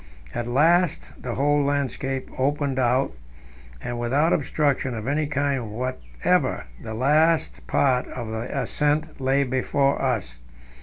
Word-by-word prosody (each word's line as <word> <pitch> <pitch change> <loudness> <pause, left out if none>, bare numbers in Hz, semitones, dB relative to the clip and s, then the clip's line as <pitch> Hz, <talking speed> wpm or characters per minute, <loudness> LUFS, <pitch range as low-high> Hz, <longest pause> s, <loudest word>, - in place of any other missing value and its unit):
At 120 - -3
last 165 +6 +2
the 120 -2 -5
whole 145 +2 +2
landscape 135 -1 -1
opened 140 0 0
out, 130 +2 +2 0.7
and 120 0 -4
without 140 +8 +2
obstruction 140 -4 0
of 110 +1 -5
any 145 +2 +1
kind 140 -5 -1
whatever 105 - -1 0.2
the 110 -1 -6
last 155 +6 +2
part 130 -2 +2
of 120 -3 -6
the 110 +2 -4
ascent 150 0 0
lay 135 +1 +3
before 135 +2 +1
us. 110 - -1
135 Hz, 125 wpm, -24 LUFS, 120-145 Hz, 0.7 s, lay